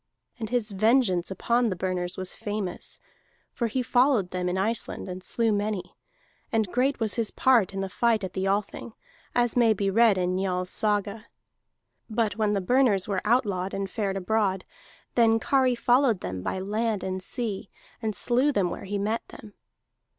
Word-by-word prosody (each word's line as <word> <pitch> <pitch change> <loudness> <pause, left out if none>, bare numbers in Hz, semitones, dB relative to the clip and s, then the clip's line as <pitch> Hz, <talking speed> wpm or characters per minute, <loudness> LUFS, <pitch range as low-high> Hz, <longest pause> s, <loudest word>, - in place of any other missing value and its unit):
And 220 -2 -4
his 235 -3 -1
vengeance 205 -3 +2
upon 235 +5 +1
the 185 - -2
Burners 180 0 -2
was 185 0 -3
famous, 205 -4 -5 0.5
for 235 - -1
he 250 +3 -1
followed 245 -6 +2
them 180 -1 -1
in 180 - -1
Iceland, 215 +2 -1
and 185 0 -6
slew 230 +2 +1
many; 205 -2 -2 0.6
and 220 -5 0
great 260 +2 +1
was 220 -2 0
his 225 -3 0
part 240 -8 +3
in 195 0 -4
the 195 - -2
fight 225 +2 +1
at 185 - -4
the 190 0 -1
Althing, 205 +3 -2 0.4
as 240 -1 +2
may 235 -3 +5
be 195 -1 -1
read 225 -1 +5
in 180 0 0
Njal's 185 -1 -1
saga. 210 0 -1 0.8
But 215 -2 0
when 215 -1 +1
the 200 - 0
Burners 215 -2 +3
were 195 -3 -1
outlawed 205 -5 +1
and 195 0 -2
fared 195 -1 -2
abroad, 195 -1 0 0.5
then 225 -1 +4
Kari 260 0 +2
followed 245 -3 +3
them 90 0 -4
by 140 - -3
land 210 +2 -1
and 185 0 -3
sea, 210 -2 -4 0.3
and 215 -2 -2
slew 250 +8 +2
them 190 -9 0
where - - -6
he 200 +1 -2
met 215 +3 -1
them. 210 -2 -13
210 Hz, 175 wpm, -26 LUFS, 190-235 Hz, 0.8 s, may